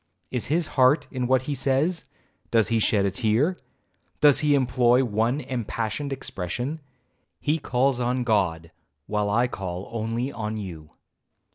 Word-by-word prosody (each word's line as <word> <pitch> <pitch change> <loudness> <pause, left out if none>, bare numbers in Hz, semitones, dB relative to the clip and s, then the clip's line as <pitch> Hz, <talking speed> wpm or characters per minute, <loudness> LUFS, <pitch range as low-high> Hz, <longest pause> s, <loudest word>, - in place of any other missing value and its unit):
Is 125 -3 -2
his 165 +4 +1 0.2
heart 145 +2 +4
in 125 -2 -2
what 130 0 +3
he 145 - -3
says? 140 +6 0 0.4
does 115 -2 +3
he 115 -1 +2
shed 105 -2 +2
a 100 - +1
tear? 120 - +1 0.6
does 145 -2 +6
he 150 -1 +3
employ 125 -1 +3
one 115 +5 0
impassioned 120 +2 -3
expression? 125 - -4 0.6
he 155 +2 0
calls 130 -1 +1
on 125 +1 0
God,—while 95 - -2
I 120 +4 +2
call 95 -5 -5
only 115 +3 -2
on 110 -2 -4
you. 85 -7 -7
120 Hz, 140 wpm, -25 LUFS, 105-135 Hz, 0.6 s, does